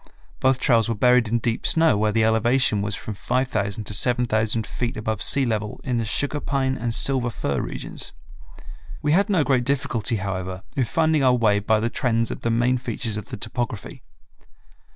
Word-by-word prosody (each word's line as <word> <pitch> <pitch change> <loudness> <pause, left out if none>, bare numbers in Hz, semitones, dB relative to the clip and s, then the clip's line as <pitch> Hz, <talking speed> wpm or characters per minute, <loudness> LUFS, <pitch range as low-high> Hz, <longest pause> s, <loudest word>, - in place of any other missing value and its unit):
Both 130 0 +2
trails 115 -4 +3
were 115 - 0
buried 125 +1 +4
in 115 +2 +1
deep 115 0 -1
snow 160 -7 +4
where 105 +1 +1
the 110 +1 +2
elevation 110 0 +2
was 100 0 -2
from 110 - -6
5000 110 -2 -2
to 105 - -2
7000 110 -1 +1
feet 120 -2 -4
above 110 -1 -3
sea 140 -1 +3
level 110 -3 -3
in 125 -3 -1
the 115 - -1
sugar 145 +6 -1
pine 135 -2 -1
and 115 -2 -2
silver 130 -3 +2
fir 70 - -2
regions. - - -5 0.9
We 150 - +1
had 200 +6 +3
no 180 -7 +3
great 130 -2 +1
difficulty, 125 -4 -1
however, 95 -2 -4
in 130 - +1
finding 160 +3 +1
our 125 -1 +4
way 105 -4 +2
by 110 +1 +1
the 115 +2 -1
trends 115 -3 0
of - - -6
the 115 - -1
main 120 +2 +1
features 115 -3 -3
of 105 -2 -5
the - - -8
topography. 115 0 -5
115 Hz, 190 wpm, -23 LUFS, 110-130 Hz, 0.9 s, buried